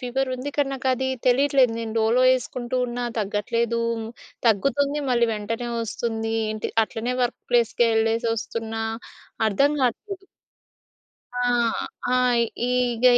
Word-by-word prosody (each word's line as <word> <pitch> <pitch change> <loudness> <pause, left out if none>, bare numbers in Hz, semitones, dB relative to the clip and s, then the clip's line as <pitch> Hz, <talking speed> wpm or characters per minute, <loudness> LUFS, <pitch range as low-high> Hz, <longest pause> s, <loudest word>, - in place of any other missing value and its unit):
Fever 260 +1 -1
ఉంది 255 +3 -5
కానీ 285 -2 +2
నాకు 265 -1 -5
అది 260 +1 -1 0.2
తెలియట్లేదు. 265 -1 +4
నేను 225 -1 -4
డోలో 225 +3 +3
వేసుకుంటూ 255 0 -1
ఉన్నా 245 0 -3
తగ్గట్లేదు, 230 +3 -1 0.7
తగ్గుతుంది 280 +7 +2
మళ్ళీ 235 -1 +3
వెంటనే 230 +3 -4
ఒస్తుంది. 225 0 -3 0.2
ఏంటి 215 0 -3
అట్లనే 235 +3 -3
వర్క్ 245 0 -1
ప్లేస్‌కేళ్ళేసొస్తున్నా 225 -1 +1 0.7
అర్థం 280 +8 +3
గాట్లేదు. 390 - -2 1.1
ఆ! - - 0 0.7
ఆ! - - +4 0.5
ఈగ 250 -1 0
240 Hz, 110 wpm, -24 LUFS, 225-255 Hz, 1.1 s, తెలియట్లేదు